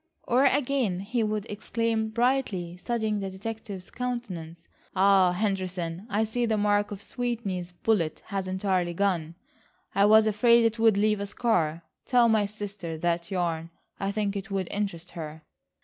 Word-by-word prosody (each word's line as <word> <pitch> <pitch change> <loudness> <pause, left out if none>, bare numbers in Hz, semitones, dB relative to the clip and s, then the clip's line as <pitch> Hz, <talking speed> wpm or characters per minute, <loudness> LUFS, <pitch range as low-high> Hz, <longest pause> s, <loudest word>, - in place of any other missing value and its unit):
Or 255 +3 +3
again, 260 -9 +1
he 230 +4 -1
would 215 -1 -1
exclaim 220 +1 -1
brightly, 220 -7 0
studying 220 +1 -1
the 195 -1 -3
detective's 200 -1 -6
countenance. 185 -10 -5 0.3
"Ah, 190 -1 +5
Henderson, 185 -2 -2
I 210 +2 +1
see 235 +2 -1
the 220 -1 +1
mark 205 0 +2
of 200 -1 -7
Sweeney's 215 -8 -3
bullet 175 -3 0
has 195 -2 -3
entirely 185 -2 0
gone. 170 -4 0 0.6
I 200 +1 +4
was 220 +1 +7
afraid 230 +2 +5
it 230 0 +1
would 225 -3 +5
leave 210 0 +2
a 200 - -3
scar. 170 -8 0 0.2
Tell 245 -2 +5
my 215 -2 +3
sister 200 -5 -6
that 170 +1 -1
yarn. 170 -3 -1 0.3
I 195 0 -1
think 205 -1 -1
it 200 +2 -5
would 195 -2 -1
interest 185 -4 -3
her." 155 -1 -7
200 Hz, 155 wpm, -27 LUFS, 180-220 Hz, 0.6 s, was